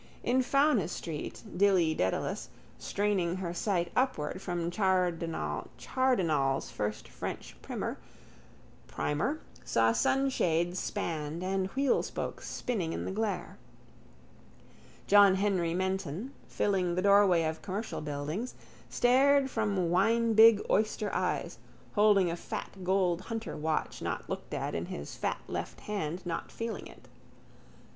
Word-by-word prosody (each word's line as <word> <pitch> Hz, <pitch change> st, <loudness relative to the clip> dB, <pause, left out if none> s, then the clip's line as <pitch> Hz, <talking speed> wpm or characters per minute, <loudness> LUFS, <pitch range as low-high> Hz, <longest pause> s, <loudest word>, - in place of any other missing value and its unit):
In 255 Hz, +2 st, +3 dB
Fownes's 265 Hz, -, +2 dB
street 155 Hz, -3 st, -6 dB
Dilly 180 Hz, -4 st, +4 dB
Dedalus, 95 Hz, -10 st, -1 dB, 0.3 s
straining 195 Hz, -4 st, 0 dB
her 180 Hz, -2 st, -3 dB
sight 175 Hz, -2 st, 0 dB
upward 190 Hz, -, 0 dB
from 175 Hz, -2 st, -2 dB
Chardenal's 175 Hz, -, 0 dB
first 105 Hz, 0 st, -3 dB
French -, -, -6 dB
primer, -, -, -4 dB, 1.6 s
saw 115 Hz, 0 st, +3 dB
sunshades 175 Hz, -, +1 dB
spanned 160 Hz, +1 st, -3 dB
and 190 Hz, 0 st, 0 dB
wheelspokes 275 Hz, -1 st, -1 dB
spinning 190 Hz, -10 st, -2 dB
in -, -, -3 dB
the -, -, -3 dB
glare. 205 Hz, -2 st, -3 dB, 1.5 s
John 200 Hz, -1 st, +7 dB
Henry 190 Hz, -4 st, +1 dB
Menton, 190 Hz, -, -2 dB
filling 185 Hz, -4 st, 0 dB
the 185 Hz, -, 0 dB
doorway 200 Hz, -4 st, +5 dB
of 160 Hz, 0 st, -2 dB
Commercial 205 Hz, +4 st, -4 dB
Buildings, 150 Hz, -, -4 dB, 0.3 s
stared 270 Hz, +2 st, +4 dB
from 200 Hz, -6 st, 0 dB
winebig 225 Hz, +2 st, +5 dB
oyster 215 Hz, 0 st, +1 dB
eyes, -, -, -1 dB, 0.3 s
holding 205 Hz, -4 st, +4 dB
a -, -, -2 dB
fat 175 Hz, -, -6 dB
gold 185 Hz, -2 st, +2 dB
hunter 225 Hz, -1 st, -5 dB
watch 155 Hz, +1 st, -2 dB
not -, -, -3 dB
looked -, -, -5 dB
at -, -, -3 dB
in -, -, -3 dB
his 70 Hz, -, -6 dB
fat -, -, -1 dB
left -, -, -5 dB
hand 185 Hz, -3 st, -4 dB
not 170 Hz, -1 st, -4 dB
feeling 230 Hz, -1 st, -5 dB
it. -, -, -16 dB
190 Hz, 115 wpm, -30 LUFS, 170-215 Hz, 1.6 s, John